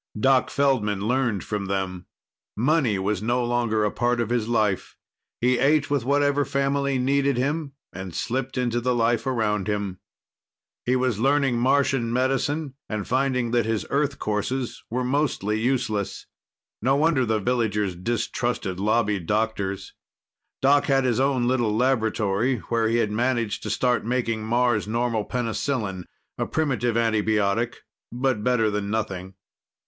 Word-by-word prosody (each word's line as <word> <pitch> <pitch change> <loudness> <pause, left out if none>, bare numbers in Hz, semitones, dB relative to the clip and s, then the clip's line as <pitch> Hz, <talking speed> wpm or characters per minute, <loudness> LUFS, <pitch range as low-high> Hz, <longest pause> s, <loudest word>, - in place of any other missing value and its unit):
Doc 130 +2 +3
Feldman 115 -8 +1
learned 120 -5 0
from 105 -2 -3
them. 95 -2 -3 0.5
Money 130 -3 +2
was 100 +1 -1
no 120 +2 0
longer 120 -3 +1
part 120 0 0
of 115 -1 -1
his 120 -3 0
life. 110 -5 0 0.4
He 125 +1 +2
ate 145 +2 +2
with 140 -4 +1
whatever 145 +1 +2
family 140 0 0
needed 140 +1 +1
him 145 +2 -1 0.2
and 95 -1 -7
slipped 130 +2 -2
into 120 -1 0
the 125 +1 +1
life 115 +1 +1
around 105 -6 0
him. 100 -3 -2 0.9
He 125 - +3
was 125 -4 0
learning 135 -1 +2
Martian 130 -2 +2
medicine 135 +4 0 0.2
and 110 -3 -3
finding 125 -2 0
that 120 -2 +2
his 110 -2 -1
Earth 145 -1 +1
courses 115 +4 -2
were 125 +2 -1
mostly 125 -6 0
useless. 115 -4 -1 0.6
No 130 +5 +3
wonder 150 -2 +3
the 110 -2 +1
villagers 105 -4 0
distrusted 115 -1 -2
Lobby 105 0 +1
doctors. 100 0 -2 0.7
Doc 140 +1 +5
had 135 -2 +2
his 125 -2 +1
own 130 -3 +2
little 120 -4 +1
laboratory 115 -1 +1
where 115 -1 +2
he 115 - +2
had 110 -3 +1
managed 115 -1 0
to - - -5
start 125 -1 +1
making 115 -2 -1
Mars 120 -2 +1
normal 115 -1 0
penicillin 115 -5 -2 0.3
a - - -1
primitive 130 -7 0
antibiotic, 110 0 +1 0.4
but 125 -3 -1
better 115 -3 +2
than 105 -1 -2
nothing. 95 -4 -3
120 Hz, 145 wpm, -24 LUFS, 105-130 Hz, 0.9 s, Doc